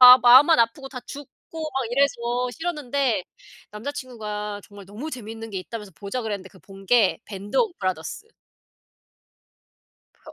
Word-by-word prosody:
마 250 0 +12
마음만 260 +7 +8
아프고 235 +4 +1
다 265 - -7
죽고 285 -2 -9 0.4
막 265 -2 -1
이래서 245 -2 +1
싫었는데 280 - -1 0.5
남자친구가 210 -4 -5
"정말 205 -1 -13
너무 215 +10 -7
재밌는 225 -4 -7
게 195 - -3
있다."면서 210 0 -8
"보자." 200 +10 -4
그랬는데 205 -5 -4
그 190 - -18
본 195 +1 -14
게 225 0 +4
밴드 200 0 -6
오브 445 -7 +2
브라더스. 185 - -3 1.9
브 - - -34
버 - - -11
235 Hz, 315 characters per minute, -24 LUFS, 205-265 Hz, 1.9 s, 마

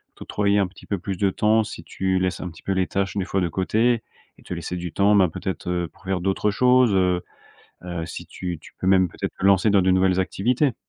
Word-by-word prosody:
t'octroyer 100 0 0
un 100 - +3
petit 90 +2 -13
peu 100 - -1
plus 95 +2 -4
de 95 +2 +1
temps, 110 +3 +2
si 105 - -8
tu 95 0 -1
laisses 95 0 -1
un 90 - -4
petit 80 - -15
peu - - -2
les 95 -1 +1
tâches 95 -1 -2
des 95 - 0
fois 95 +1 -1
de 90 -2 0
côté 110 +7 +1 0.4
et - - -18
te - - -14
laisser 85 +1 -5
du 90 -1 -5
temps, 100 +5 +3
ben, 95 -3 +5
peut-être, 90 +1 -5
heu, 90 -1 -1
pour - - -23
faire 95 -1 -1
d'autres 95 +3 0
choses, 125 +2 +4
heu 90 -2 +2 0.6
heu, 85 -2 -4
si - - -8
tu 90 -2 -5
tu - - -14
peux 95 - -2
même 95 -2 +4
peut-être - - -5
te - - -2
lancer 100 +2 +5
dans 100 -1 +4
de 95 +1 +3
nouvelles 95 0 +3
activités? 120 +7 0
95 Hz, 250 wpm, -23 LUFS, 90-100 Hz, 0.6 s, ben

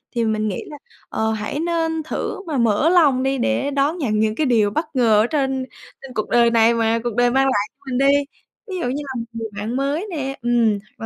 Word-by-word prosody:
thì 235 -1 +1
mình 215 -1 0
nghĩ 190 - -3
là, 295 - -9 0.3
ờ, 220 0 -1
hãy 220 +7 -3
nên 325 -1 -1
thử 320 +4 -4
mà 295 -4 -2
mở 235 +6 +3
lòng 290 -8 +4
đi 270 0 0
để 270 +2 0
đón 285 +5 +1
nhận 215 -9 0
những 215 0 +1
cái 305 - 0
điều 220 -5 +2
bất 315 +9 -1
ngờ 225 -4 +4
ở - - 0
trên 265 -2 -1 0.4
trên 270 -2 -10
cuộc 215 - -3
đời 235 -1 +4
này 230 0 +4
mà 230 0 +1
cuộc 240 -3 -3
đời 245 0 +3
mang 270 +1 +3
lại 210 -6 +1
cho - - -65 0.2
mình 250 - 0
đi. 275 +1 +4 0.5
Ví 380 - -5
dụ - - -1
như 280 +4 -3
là 265 - -5
một 230 - -4
người 225 -1 -4
bạn 220 +4 -3
mới 280 +8 -1
nè, 275 -4 -3
ừm, 235 -4 +2 0.2
hoặc 225 - -6
250 Hz, 245 wpm, -21 LUFS, 225-280 Hz, 0.5 s, lòng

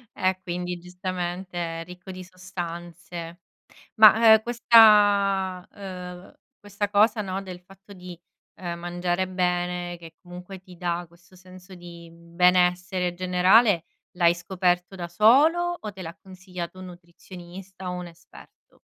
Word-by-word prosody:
E 185 0 0
quindi, 180 0 -4
giustamente, 180 0 -5 0.2
è - - -6
ricco 180 +1 -11
di 185 0 -9
sostanze. 175 -2 -8 0.6
Ma, 220 +1 +8
ehm, 220 - +5
questa 205 -5 +4
uhm, 180 -2 -9 0.3
questa 205 0 -4
cosa, 215 +2 +3
no, 195 -1 -4
del 185 -2 -10
fatto 195 +2 -17
di, 180 -2 -11 0.4
ehm, 170 -2 -5
mangiare 175 +1 -2
bene, 180 -1 -2
che 165 -1 -14
comunque 180 +1 -11
ti 185 -1 -16
dà 175 0 -3
questo 175 +3 -23
senso 185 +1 -15
di 170 -1 -12
benessere 180 +2 +1
generale, 185 +2 +3 0.3
l'hai 170 -2 +4
scoperto 180 +1 -1
da 175 -2 -6
solo, 300 - +3
o 210 -2 -7
te 190 - -10
l'ha 170 +1 -8
consigliato 185 -1 -9
un 185 - -9
nutrizionista, 180 +1 -11
o - - -4
un 180 -1 -6
esperto? 170 0 -19
180 Hz, 135 wpm, -24 LUFS, 175-190 Hz, 0.6 s, Ma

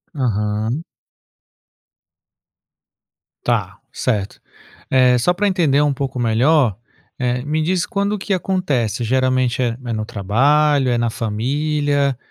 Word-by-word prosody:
Aham. 110 +1 -1 2.6
Tá, - - -1
certo. 105 -5 -2 0.5
Eh, 125 -1 +4
só 130 +9 +2
pra 205 +3 0
entender 160 -8 +2
um 145 -1 +2
pouco 135 -1 -4
melhor, 120 - +2 0.4
eh, 125 -1 -1
me 155 +3 -1
diz 180 +3 0
quando 205 -1 -1
que 200 0 -2
acontece? 150 - -1
Geralmente 130 0 +1
é 120 -2 -1
é 120 - -2
no 110 -1 -3
trabalho, 135 +8 +2
é 120 - +1
na 120 0 0
família, 140 +5 -1
130 Hz, 115 wpm, -19 LUFS, 115-150 Hz, 2.6 s, Eh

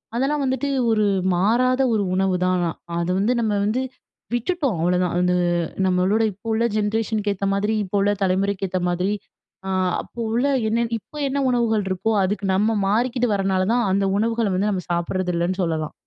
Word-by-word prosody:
அதெல்லாம் 280 +4 0
வந்துட்டு 265 +2 -1 0.2
ஒரு 215 -1 +2 0.3
மாறாத 250 +7 +2
ஒரு 205 -2 +1
உணவுதான் 185 -1 +1
ஆனா. 170 -2 0 0.3
அது 170 +1 -1
வந்து 225 +5 +2
நம்ம 220 - 0
வந்து 225 +5 0 0.5
விட்டுட்டோம் 265 - 0
அவ்வளதான். 180 0 +1
அது 180 0 +2 0.5
நம்மளோட 185 +4 +2
இப்போ 205 +4 -14
உள்ள 225 - +1
ஜென்ரேஷனுக்கு 215 -1 0
ஏத்த 195 +1 -3
மாதிரி 210 +2 0
இப்ப 200 +1 -2
உள்ள 205 +1 +3
தலைமுறைக்கு 195 +1 0
ஏத்த 185 0 -1
மாதிரி, 180 +3 0 0.6
அ - - -3 0.3
அப்போ 240 - -13
உள்ள 245 +4 +1 0.2
என்ன 235 +1 +1
இப்போ 300 - -14
என்ன 280 +1 -1
உணவுகள் 225 -4 +1
இருக்கோ, 190 +4 0
அதுக்கு 200 +1 -1
நம்ம 215 +3 +2
மாறிக்கிட்டு 240 +3 +1
வரனாலதான், 195 +4 +1
அந்த 195 0 +2
உணவுகள 230 0 +1
வந்து 205 +3 +1
நம்ம 185 -3 -2
சாப்பிடுறது 180 +1 -1
இல்லன்னு 180 +3 -1
சொல்லலாம். 160 -2 -2
205 Hz, 165 wpm, -22 LUFS, 185-230 Hz, 0.6 s, உள்ள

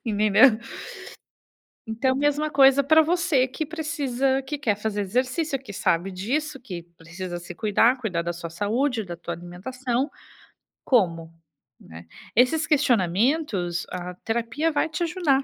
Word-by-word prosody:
Entendeu? 215 +3 +5 1.3
Então, 240 +4 0
mesma 290 +2 +1
coisa 275 -1 +5
para 315 +2 +6
você 320 -5 +2
que 310 +4 -4
precisa 275 -5 -1
que 290 +3 -4
quer 225 -8 0
fazer 210 0 -3
exercício, 255 - -1
que 240 -6 -11
sabe 185 +1 0
disso, 270 +9 -2
que 180 -8 -7
precisa 175 +2 -7
se 175 - -8
cuidar, 225 +4 +3
cuidar 185 -8 -2
da 175 - -2
sua 170 0 -7
saúde, 220 - -1
da 175 -2 -7
tua 170 0 -5
alimentação. 240 - -3 0.8
Como, 165 -9 +1 0.5
né? 80 +1 -12 0.3
Esses 280 +7 +3
questionamentos, 225 - +1
a 180 0 -5
terapia 235 - -1
vai 305 +1 0
te 320 +3 -2
ajudar, 315 -6 +1
245 Hz, 135 wpm, -24 LUFS, 185-285 Hz, 1.3 s, para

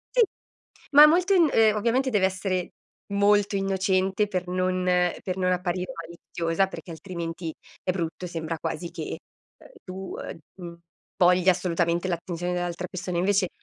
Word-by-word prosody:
Sì, - - +6 0.7
ma 295 +1 +10
molto 355 +5 +3
in 345 -5 +5
ehm, 220 -3 +4
ovviamente 245 +5 +1
deve 200 -4 +3
essere 185 -1 -2 0.4
molto 205 0 +3
innocente, 195 +1 +1
per 185 -2 -2
non 185 0 0
per 180 +1 0
non 185 -1 +1
apparire 180 0 -2
maliziosa, 165 +2 -2
perché 190 - -9
altrimenti 165 0 -5 0.3
è - - 0
brutto, 175 0 -4
sembra 165 -1 -4
quasi 165 +1 -4
che, - - -6 0.4
uhm, - - -17
tu, 190 0 -7
uhm, - - -7 0.2
mhmm, 170 -2 -9 0.4
voglia 180 0 +5
assolutamente 170 0 0
l'attenzione 175 0 -3
dell'altra 175 0 -3
persona 180 -1 -5
invece, 190 +1 +2
185 Hz, 145 wpm, -26 LUFS, 175-195 Hz, 0.7 s, ma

